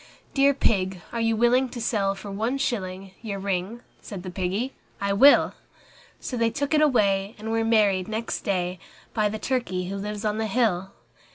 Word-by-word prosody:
III - - -24
"Dear 280 0 +4
Pig, 190 -7 +1
are 235 - -2
you 225 0 +2
willing 245 +3 +3
to 240 - -7
sell 200 -4 0
for 200 +1 -8
one 225 +7 -1
shilling 195 -8 -3
Your 210 -4 -4
ring?" 195 +4 -2 0.2
Said 195 -4 -8
the 185 - -6
Piggy, 195 +8 -2 0.3
"I 200 0 0
will." 275 +8 +6 0.7
So 255 - -5
they 230 -1 +3
took 285 +5 -2
it 305 - +4
away, 200 -8 +2
and 220 +1 -5
were 225 0 +1
married 210 -5 +3
next 220 +1 -3
day 180 -3 -1 0.3
By 215 -2 +2
the 220 - -4
turkey 210 -7 -2
who 195 - -3
lives 210 +2 -4
on 210 +1 0
the 220 - 0
hill. 195 -5 +1
210 Hz, 190 wpm, -25 LUFS, 195-235 Hz, 0.7 s, will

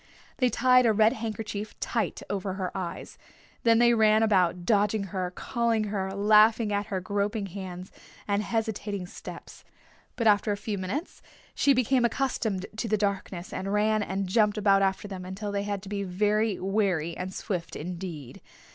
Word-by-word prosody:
They 255 -2 +3
tied 255 0 +4
a 220 - +4
red 220 +2 +4
handkerchief 215 -3 -5
tight - - -2
over 195 -1 -3
her 185 -1 -4
eyes. 185 -3 -6 0.4
Then 230 -1 +4
they 240 0 +5
ran 220 -1 +4
about, 180 -5 +2
dodging 210 0 +2
her, 185 -2 -1
calling 230 +3 -1
her, 190 -1 -2
laughing 215 +2 +4
at 205 0 -1
her 190 - -2
groping 205 +2 -1
hands 185 -1 -7 0.4
and 200 0 +1
hesitating 210 -3 -2
steps. - - -10 0.5
But 235 - -2
after 210 -1 +4
a 205 - -1
few 205 -1 -4
minutes 230 - -4 0.3
she 280 -1 +3
became 255 0 +2
accustomed 230 -6 -1
to 230 - -2
the 215 0 +1
darkness 200 -1 -3
and 195 +1 -3
ran 215 +1 +2
and 195 -1 -2
jumped 210 +2 +2
about 200 -2 +4
after 195 +1 0
them 190 -2 -7
until 195 +3 -5
they 200 0 -1
had 200 -2 -3
to 195 - -9
be 200 -1 -2
very 210 +2 0
wary 190 -5 0
and 185 +1 -5
swift 185 -3 -4
indeed. 170 -5 -7
205 Hz, 170 wpm, -27 LUFS, 190-220 Hz, 0.5 s, they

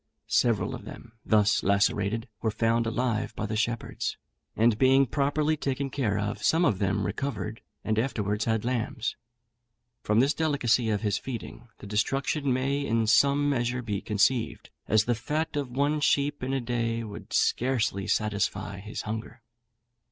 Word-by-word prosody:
Several 115 -4 +1
of - - -7
them, 115 - -10
thus 110 0 +3
lacerated, 100 +3 +1
were 110 - +1
found 115 +1 +1
alive 115 -1 -1
by 105 - -3
the 110 +1 -3
shepherds; 115 +1 -2 0.4
and 110 -1 +3
being 135 +1 +5
properly 145 +4 +1
taken 135 -1 -2
care 110 -8 0
of, 100 0 -2
some 165 +2 +3
of 105 - +1
them 95 -1 0
recovered, 125 -5 -3 0.2
and 110 0 0
afterwards 105 -4 -1
had 110 -1 0
lambs. 120 -1 -2 0.9
From 105 +1 +2
this 140 +4 +4
delicacy 130 -7 +1
of 105 -2 0
his 105 -2 0
feeding, 120 -1 -7
the - - -12
destruction 135 +7 0
may 135 +3 0
in 115 -3 +1
some 140 +6 +4
measure 125 -2 0
be 105 -4 -2
conceived, 115 +3 0 0.2
as 110 0 +3
the 120 - +2
fat 150 +8 -2
of 140 -3 -2
one 140 +4 +1
sheep 145 0 +1
in 130 +1 -2
a 135 - +1
day 115 -1 -1
would 105 -2 -9
scarcely 115 -7 +1
satisfy 100 -2 -1
his 105 +2 -6
hunger. 110 +1 -6
115 Hz, 160 wpm, -27 LUFS, 105-135 Hz, 0.9 s, being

